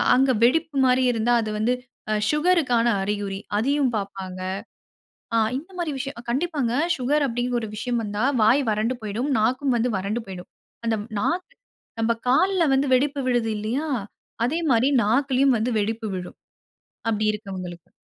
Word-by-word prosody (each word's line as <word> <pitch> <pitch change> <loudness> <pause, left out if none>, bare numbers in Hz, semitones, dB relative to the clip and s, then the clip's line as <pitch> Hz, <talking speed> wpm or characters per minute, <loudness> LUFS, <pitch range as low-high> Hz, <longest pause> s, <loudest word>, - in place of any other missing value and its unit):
அங்க 265 +1 +4
வெடிப்பு 305 +2 +1
மாரி 255 0 +3
இருந்தா, 235 +1 +1
அது 215 - -3
வந்து 240 +3 +2 0.6
சுகருக்கான 300 -7 +2 0.2
அறிகுறி. 200 -1 -2 0.2
அதையும் 275 +2 +2
பாப்பாங்க. 195 -2 -6 1.0
அ - - +4 0.2
இந்த 335 +7 -9
மாரி 335 -4 -1
விஷயம், 275 -2 -5
அ - - -10
கண்டிப்பாங்க. 275 -3 0 0.2
சுகர் 285 +3 +1
அப்டிங்கிற 245 +1 -1
ஒரு 220 - -4
விஷயம் 240 +2 -1
வந்தா, 205 +2 -2 0.2
வாய் 255 +6 +5
வறண்டு 220 +4 0
போய்டும். 220 +7 -2
நாக்கும் 255 +3 +1
வந்து 240 +1 +1
வறண்டு 205 +5 -2
போய்டும். 180 -2 -8 0.4
அந்த 225 -1 +1
ம் - - -12
நாக்கு 365 - -1 0.5
நம்ப 230 +1 +2
கால்ல 365 +7 +3
வந்து 270 +1 +2
வெடிப்பு 280 +2 0
விழுது 240 -3 +1
இல்லையா, 235 +9 -2 0.6
அதே 320 +7 0
மாரி 245 +4 +4
நாக்கிலயும் 265 +3 +3
வந்து 240 +3 0
வெடிப்பு 220 +1 -2
விழும். 180 -1 -7 0.7
அப்படி 215 -1 0
இருக்கவங்களுக்கு. 185 -5 -7
240 Hz, 150 wpm, -24 LUFS, 215-275 Hz, 1.0 s, வாய்